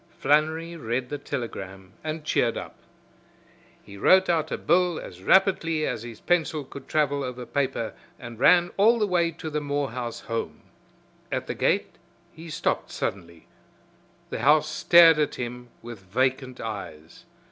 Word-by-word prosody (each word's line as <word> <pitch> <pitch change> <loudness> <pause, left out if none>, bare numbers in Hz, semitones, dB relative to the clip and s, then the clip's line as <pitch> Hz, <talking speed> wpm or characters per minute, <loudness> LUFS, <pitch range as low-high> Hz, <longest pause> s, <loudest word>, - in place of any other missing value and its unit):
Flannery 160 +4 +1
read 125 -3 -3
the 145 - -4
telegram 95 -9 -6
and 155 0 -4
cheered 120 -6 +1
up. - - -7 1.1
He 100 - -12
wrote 185 - +5
out 160 -2 +1
a - - -1
bill 175 -1 +2
as 90 0 -10
rapidly 165 - +3
as 110 - -3
his 115 -2 -9
pencil 160 -3 0
could 135 +1 -11
travel 145 -2 0
over 125 -1 -6
paper 130 -3 -2 0.2
and 120 -2 -10
ran 175 +5 +5
all 225 +4 +5
the 215 - +1
way 175 -3 +1
to 160 -1 -7
the 150 0 -1
Morehouse 135 -5 -3
home. 115 0 -4 0.7
At - - -2
the - - -4
gate - - 0 0.3
he 165 +1 -11
stopped 160 +1 -1
suddenly. 85 -4 -5 0.9
The - - -3
house 150 +1 +4
stared 165 +1 +6
at 150 - 0
him 125 0 -6
with 120 -2 -8
vacant 130 +6 -1
eyes. 85 -7 -8
140 Hz, 150 wpm, -25 LUFS, 120-165 Hz, 1.1 s, stared